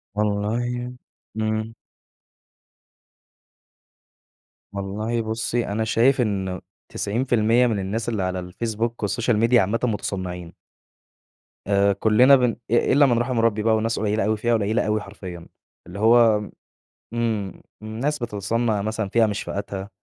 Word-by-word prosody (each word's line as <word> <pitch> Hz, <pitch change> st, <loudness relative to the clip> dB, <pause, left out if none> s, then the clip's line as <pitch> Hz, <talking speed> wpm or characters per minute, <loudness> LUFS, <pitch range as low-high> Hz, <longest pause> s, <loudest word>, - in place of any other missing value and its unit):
والله 115 Hz, +4 st, -1 dB, 0.4 s
إمم. 110 Hz, +1 st, -2 dB, 3.0 s
والله 105 Hz, +4 st, -2 dB
بصي، 115 Hz, +2 st, -2 dB
أنا 105 Hz, +2 st, -1 dB
شايف 125 Hz, +4 st, +3 dB
إنه 95 Hz, -4 st, -2 dB, 0.3 s
90% 120 Hz, +1 st, +1 dB
من 110 Hz, -4 st, -1 dB
الناس 110 Hz, +5 st, -3 dB
اللي 105 Hz, -5 st, -1 dB
على 90 Hz, -1 st, -4 dB
الFacebook 115 Hz, +2 st, -2 dB, 0.2 s
والsocial 115 Hz, +3 st, 0 dB
media 120 Hz, +2 st, +4 dB
عامةً 110 Hz, +1 st, +3 dB
متصنعين. 95 Hz, -6 st, -3 dB, 1.1 s
آآ 100 Hz, 0 st, +3 dB
كلنا 115 Hz, +7 st, +5 dB
بن 125 Hz, -3 st, +1 dB, 0.2 s
إ -, -, +2 dB, 0.2 s
إلا 145 Hz, +1 st, +6 dB
من 120 Hz, -3 st, +2 dB
رحم 120 Hz, 0 st, -1 dB
ربي 110 Hz, -2 st, +1 dB
بقى 110 Hz, -1 st, +3 dB
وناس 115 Hz, +1 st, -1 dB
قليلة 105 Hz, -1 st, 0 dB
أوي 110 Hz, +1 st, +1 dB
فئة 120 Hz, +2 st, 0 dB
قليلة 110 Hz, +1 st, +1 dB
أوي 105 Hz, 0 st, 0 dB
حرفيًا. 90 Hz, -4 st, -9 dB, 0.4 s
اللي 95 Hz, +3 st, -8 dB
هو 110 Hz, -2 st, +4 dB, 0.6 s
إمم 110 Hz, -5 st, -2 dB, 0.2 s
ناس 125 Hz, +8 st, -3 dB
بتتصنع 110 Hz, -1 st, -1 dB
مثلًا 110 Hz, -1 st, -3 dB
فئة 115 Hz, +1 st, +3 dB
مش 105 Hz, -1 st, -2 dB
فئتها، 100 Hz, -1 st, -5 dB
110 Hz, 125 wpm, -23 LUFS, 100-115 Hz, 3.0 s, إلا